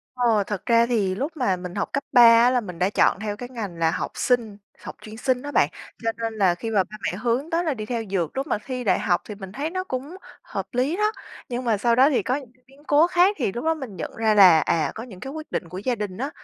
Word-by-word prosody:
Ờ, 235 -4 +2
thật 205 -3 -4
ra 235 0 +4
thì 205 -6 0
lúc 290 - -4
mà 200 -8 +1
mình 180 0 -8
học 200 - -2
cấp 280 - -1
3 245 -3 +7 0.2
á 245 - +5
là 250 -1 +1
mình 180 -6 -9
đã 185 +2 +2
chọn 195 - +2
theo 210 -1 -4
cái 245 +1 -7
ngành 205 -9 -6
là 165 -1 +2
học - - -3
Sinh, 230 -5 0 0.2
học - - -8
chuyên 215 +1 -10
Sinh 255 0 0
đó 290 0 -6
bạn, - - +3 0.3
cho 225 - +1
nên 225 -1 -3
là 190 -5 +2
khi 225 +6 -5
mà 195 -3 +3
ba 215 - -11
mẹ 180 - -2
hướng 245 +7 -1
tới 335 +1 0
là 310 -4 0
đi 215 -3 -6
theo 230 -1 -3
dược, 180 - -2
lúc 275 - -2
mà - - 0
thi 255 -2 -4
đại 200 - +2
học 175 -2 +1
thì 210 - -7
mình 195 -2 -9
thấy 290 +7 -3
nó 370 +1 -3
cũng 275 +2 -5 0.3
hợp - - -5
lý 270 +8 0
đó. 425 +1 +2 0.4
Nhưng 245 +1 -3
mà 225 -3 +2
sau 235 +3 +2
đó 265 +4 +6
thì 275 - +1
có 255 - 0
những 265 -5 -7 0.2
biến 275 +2 -21
cố 295 +3 +5
khác 365 +3 +3
thì 230 - 0
lúc 240 - -5
đó 325 - +3
mình 265 -10 -8
nhận - - -5
ra 220 -1 +2
là, 180 -5 +8
à, 155 +1 0
có 225 - -6
những 200 -7 -11
cái 270 +2 -7
quyết 315 0 -8
định 170 - -3
của 180 - -7
gia 240 +5 -1
đình 205 -4 -5
á, 270 +4 -3
235 Hz, 290 wpm, -24 LUFS, 200-270 Hz, 0.4 s, là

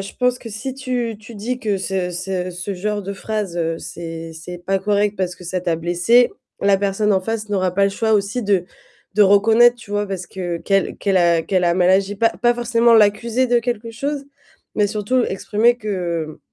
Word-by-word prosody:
je 195 0 -7
pense 250 0 +1
que 235 - -9
si 220 +5 -5
tu 250 -4 -3
tu 220 +2 -12
dis 240 +5 -3
que 210 -5 -1
ce 190 -1 -2
ce 180 +1 -3
ce 180 +3 -5
genre 205 +3 -2
de 200 +1 -5
phrase, 200 -3 -4 0.2
c'est 165 0 -7
c'est 165 +2 -8
pas 195 +2 -1
correct 205 +1 +1
parce 180 -1 -2
que 180 - -14
ça 180 +1 -2
t'a 175 -2 0
blessé, 175 +9 +3 0.3
la 200 0 +4
personne 205 +1 +1
en 190 - +2
face 220 +2 -4
n'aura 185 -3 0
pas 200 +1 +3
le 200 - +2
choix 220 +2 0
aussi 205 +4 +1
de 195 -4 +1 0.5
de 210 - +5
reconnaître 220 +5 +5
tu 235 -4 -14
vois, 205 0 0
heu, - - -11
parce 185 -2 -4
que 175 -3 -4
qu'elle 195 +3 0
qu'elle 195 -1 +1
a 170 -2 +3
qu'elle 185 +1 0
a 170 0 +3
mal 180 0 +3
agi, 195 +2 +2
pas 230 +3 +3
pas 240 +8 +1
forcément 235 0 +3
l'accusé 225 +4 +3
de 240 0 +3
quelque 235 -1 -3
chose, 280 +4 -3 0.5
mais 210 - +2
surtout 215 +5 0
exprimer 215 +5 +1
que 175 -8 -3
200 Hz, 210 wpm, -20 LUFS, 185-225 Hz, 0.5 s, de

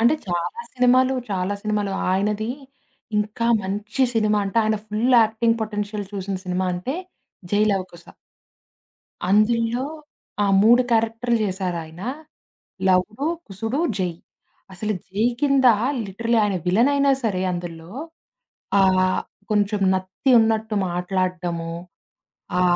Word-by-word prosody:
అంటే 235 +6 +5
చాలా 175 - -2
సినిమాలు 255 +1 +4 0.2
చాలా 190 +1 -1
సినిమాలు. 210 -2 -1 0.2
ఆయనది 210 +4 0 0.7
ఇంకా 215 +3 -1 0.2
మంచి 205 +6 -2
సినిమా 215 -2 +2
అంటే 200 +4 0
ఆయన 215 0 +1
ఫుల్ 225 +5 +2
యాక్టింగ్ 230 +1 +1
పొటెన్షియల్ 210 -1 -4
చూసిన 195 0 -3
సినిమా 185 0 -1
అంటే 180 +10 -3 0.6
'జైలవకుశ'. 195 -4 0 1.2
అందుల్లో 230 +4 +2 0.6
ఆ! - - +3 0.2
3 240 +3 +6
క్యారెక్టర్లు 230 +1 +1
జేశారాయన. 180 -4 -3 0.9
లవుడు, 210 +9 +1 0.2
కుసుడు, 225 +8 -3 0.2
జై. 180 -2 0 0.6
అసలు 215 +3 -2 0.2
జై 205 +4 -1 0.2
కిందా 275 -4 +5 0.3
లిటరల్లీ 230 +4 0
ఆయన 200 -2 0
విలనైనా 275 +9 +3
సరే 195 -5 0
అందుల్లో. 170 -1 -6 0.9
ఆహ్, 185 -1 +3 0.3
కొంచెం 205 0 +1
నత్తి 185 +8 -1
ఉన్నట్టు 220 -1 +1
మాట్లాడ్డము. 180 -1 -2 0.9
ఆ - - +3
210 Hz, 105 wpm, -22 LUFS, 185-230 Hz, 1.2 s, 3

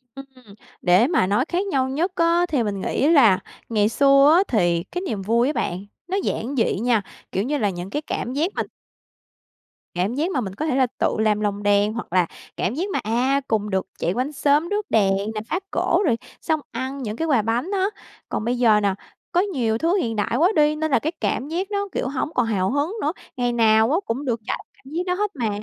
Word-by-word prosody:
Ừm. 275 0 -8 0.6
Để 185 +7 +4
mà 315 - +2
nói 205 +7 +2
khác 365 +3 0
nhau 265 -8 0
nhất 330 +8 -1
á, 340 0 +3
thì 275 -6 +1
mình 200 -3 -3
nghĩ 275 - 0
là 230 - +6 0.3
ngày 210 -2 +2
xưa 275 +4 +5
á 380 - +5
thì 175 -7 +1
cái 355 - -5
niềm 220 - -3
vui 230 +5 +2
á 300 - 0
bạn, 190 - -3 0.2
nó 375 +2 -1
giản 260 +5 -2
dị 225 -6 +1
nha. 235 -1 +2 0.3
Kiểu 195 - 0
như 290 +5 -1
là, 210 -7 +1
những 180 0 -6
cái 295 - -2
cảm 255 -4 -4
giác 315 +7 0
mà - - 0 1.3
cảm 185 +6 0
giác 320 +7 0
mà 270 - 0
mình 195 -4 -5
có 305 - -3
thể 310 - 0
là 260 -2 +3
tự - - +1
làm 215 -1 +2
lồng 205 -1 -2
đèn 205 +1 +3
hoặc 230 -6 -6
là 180 -2 +4 0.3
cảm 190 - -1
giác 360 +8 -2
mà, - - -1
à, 255 +6 +1
cùng 210 -2 0
được 190 -1 -1
chạy 170 - 0
quanh 255 +6 -2
xóm 295 +3 +2
rước 415 0 -2
đèn 195 -3 +3 0.2
nè, 215 - -2
phá 355 - 0
cổ, - - +1
rồi 230 - +2 0.2
xong 315 -1 0
ăn 265 +1 -4
những 215 -2 -4
cái 325 - -1
quà 265 -8 +3
bánh 235 - -1
á. 385 -1 +2 0.4
Còn - - -2
bây 245 +1 0
giờ 225 -4 +5
nè, 200 -2 +1 0.4
có 355 - +3
nhiều 255 - 0
thứ 335 +9 +1
hiện 235 - -1
đại 210 +2 -1
quá 345 +6 +4
đi, 300 0 +4
nên 315 0 -2
là - - +4
cái 315 - -2
cảm 275 - -1
giác 370 +6 -3
nó, 405 0 -1
kiểu, - - -2
hổng 275 +1 -2
còn 245 - +2
hào 195 -4 0
hứng 290 +7 0
nữa. 300 - +1 0.3
Ngày 245 -1 +1
nào 220 0 +4
á 320 - +3
cũng 260 +6 -3
được 235 -3 -1
trải - - -1
qua - - -13 0.2
cảm 270 +3 -12
giác 350 +2 -1
đó 360 - 0
hết 415 +2 -1
mà. 230 -5 -1
255 Hz, 240 wpm, -22 LUFS, 215-310 Hz, 1.3 s, là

